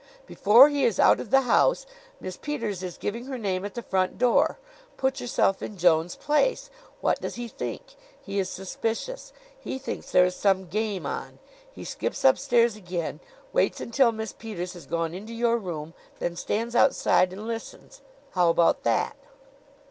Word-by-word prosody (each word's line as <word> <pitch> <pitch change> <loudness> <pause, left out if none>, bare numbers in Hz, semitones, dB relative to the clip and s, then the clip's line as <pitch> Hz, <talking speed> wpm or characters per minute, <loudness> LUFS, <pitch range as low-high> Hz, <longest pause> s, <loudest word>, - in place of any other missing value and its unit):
"Before 235 - +7
he 290 -2 0
is 230 -6 +1
out - - +6
of 225 - -6
the 270 +3 +5
house - - +3 0.3
Miss 185 - -6
Peters 230 -11 -4
is 180 -2 -6
giving 235 +4 -4
her 265 -1 -5
name 190 -5 -2
at 205 - -6
the 240 - -5
front 185 -3 0
door. 245 -1 +3 0.4
Put 265 0 -1
yourself 195 -5 +1
in 210 - -6
Jones' 170 -1 +3
place. - - 0 0.3
What - - +1
does - - -4
he 240 0 -5
think? - - -7 0.3
He 200 0 -4
is 190 -1 -1
suspicious. 225 - -4 0.3
He 380 - -5
thinks 265 - -6
there 180 - +6
is 180 0 -2
some 190 -1 +1
game 210 +1 -2
on. - - -5 0.3
He - - -10
skips 275 - -4
upstairs 240 -4 +4
again, 180 -5 -4 0.3
waits - - +1
until 235 +1 +2
Miss 220 -1 -5
Peters 185 -6 -6
has 175 - -12
gone 165 -1 -2
into 215 +6 -8
your 235 0 +2
room, 165 -5 -6 0.2
then 175 - -3
stands 230 +6 -2
outside 185 -8 +4
and 200 +3 -8
listens. 230 -1 -7 0.3
How 180 -2 +3
about 165 0 +3
that?" - - 0
215 Hz, 170 wpm, -26 LUFS, 185-240 Hz, 0.4 s, Before